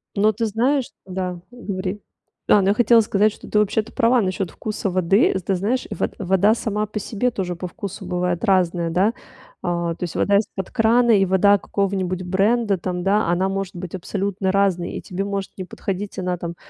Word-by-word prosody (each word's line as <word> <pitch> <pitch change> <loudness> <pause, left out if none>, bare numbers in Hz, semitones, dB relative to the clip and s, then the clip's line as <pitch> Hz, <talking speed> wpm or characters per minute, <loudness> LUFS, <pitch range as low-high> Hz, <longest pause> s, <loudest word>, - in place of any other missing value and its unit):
Ну, 215 +1 +4
ты 230 +2 -2
знаешь 245 +5 0
Да, 185 -1 -4
говори. 200 -4 -4 0.5
Ну, 205 - +6
я 195 +2 +3
хотела 235 +1 +5
сказать, 210 0 +2
что - - -13
ты, - - +1
вообще-то, 210 +1 +1
права 235 +1 +3
насчет 185 -2 -2
вкуса 215 -2 -3
воды. 185 +3 +3
Ты 190 +1 -1
знаешь, 225 +8 -1
вод - - -2
вода 195 +2 +3
сама 215 -2 -2
по 215 0 -5
себе 240 +5 -1
тоже 185 -5 -3
по 180 +1 -5
вкусу 195 +2 -7
бывает 180 0 -1
разная, 180 -4 +2
да. 190 +7 +2 0.5
А, 170 -1 -1
то - - -7
есть 175 - -4
вода 200 - +2
из-под 195 -3 -5
крана 235 0 +4
и 195 -3 +5
вода 195 +2 +4
какого-нибудь 190 -2 -2
бренда 200 +3 +2
там, 180 0 -3
да, 200 +2 +2
она 180 +2 +2
может 195 0 -3
быть 180 0 -6
абсолютно 195 +1 -2
разной, 190 -3 +1
и - - -5
тебе 190 +2 -4
может 200 -1 -3
не 190 - -4
подходить 195 +2 -5
она 180 -1 -1
там 170 0 -5
195 Hz, 190 wpm, -22 LUFS, 180-210 Hz, 0.5 s, Ну